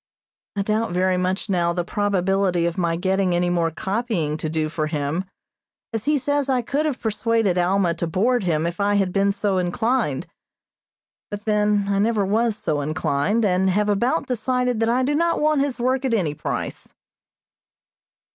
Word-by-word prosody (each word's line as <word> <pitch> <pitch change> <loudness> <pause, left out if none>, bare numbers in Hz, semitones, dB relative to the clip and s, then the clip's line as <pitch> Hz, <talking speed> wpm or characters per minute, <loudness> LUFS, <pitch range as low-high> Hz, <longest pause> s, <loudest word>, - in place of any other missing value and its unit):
I 200 - 0
doubt 215 -1 -1
very 185 +1 +2
much 185 +3 -1
now 175 -3 +1
the 175 0 -1
probability 195 -2 +1
of 170 -1 -1
my 170 -3 0
getting 190 0 +1
any 175 0 +1
more 170 -2 +1
copying 190 -3 -2
to 155 0 -3
do 155 0 -1
for 155 0 -2
him, 150 +4 -2 0.7
as 225 0 -3
he 300 0 +3
says 285 +1 0
I 255 -2 +1
could 290 +6 0
have 275 -5 -3
persuaded 220 -2 0
Alma 180 0 +2
to 170 0 -3
board 225 +8 +1
him 160 -3 0
if 170 +2 -3
I 205 0 +2
had 195 -3 +1
been 200 0 +2
so 200 -1 0
inclined; 200 - 0 1.0
but 205 0 -7
then 210 -1 +2
I 200 0 +1
never 210 -1 +2
was 220 +2 +1
so 150 -8 -1
inclined, 155 +8 0
and 190 0 +2
have 210 +3 +1
about 245 +10 +1
decided 250 -1 -1
that 225 0 +1
I 250 +2 +2
do 280 +3 +1
not 335 +3 +1
want 300 -1 +2
his 280 -3 -2
work 255 +2 +1
at 255 -4 +1
any 170 -9 0
price. - - -5
200 Hz, 180 wpm, -22 LUFS, 175-230 Hz, 1.0 s, he